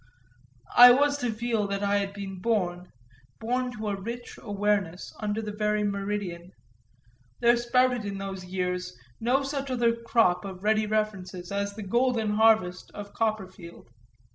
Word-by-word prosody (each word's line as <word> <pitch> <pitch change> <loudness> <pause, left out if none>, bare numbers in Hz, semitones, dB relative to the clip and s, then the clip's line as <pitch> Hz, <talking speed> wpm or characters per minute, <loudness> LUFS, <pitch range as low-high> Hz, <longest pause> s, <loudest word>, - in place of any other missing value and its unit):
I 245 0 +11
was 285 +2 +2
to 245 -3 -1
feel 220 -2 -1
that 200 0 -3
I 200 0 +2
had 200 -1 -2
been 195 -2 -7
born, 180 -5 -1 0.5
born 250 +2 -1
to 215 -3 -4
a 200 - -1
rich 235 +4 -7
awareness, 205 -4 -1
under 215 +1 -2
the 210 - -4
very 210 0 0
meridian; 200 -3 -3 0.9
there 235 0 +5
sprouted 245 0 +2
in 200 -1 -4
those 195 -1 -6
years 180 -2 -3 0.2
no 255 +4 +1
such 275 0 -3
other 235 -2 +2
crop 230 -6 +2
of 190 -1 -8
ready 215 0 +2
references 195 -4 -3
as 200 0 -2
the 215 - -6
golden 235 +1 +1
harvest 210 -4 +3
of 205 -1 -8
Copperfield. 190 - -4
210 Hz, 150 wpm, -27 LUFS, 195-235 Hz, 0.9 s, I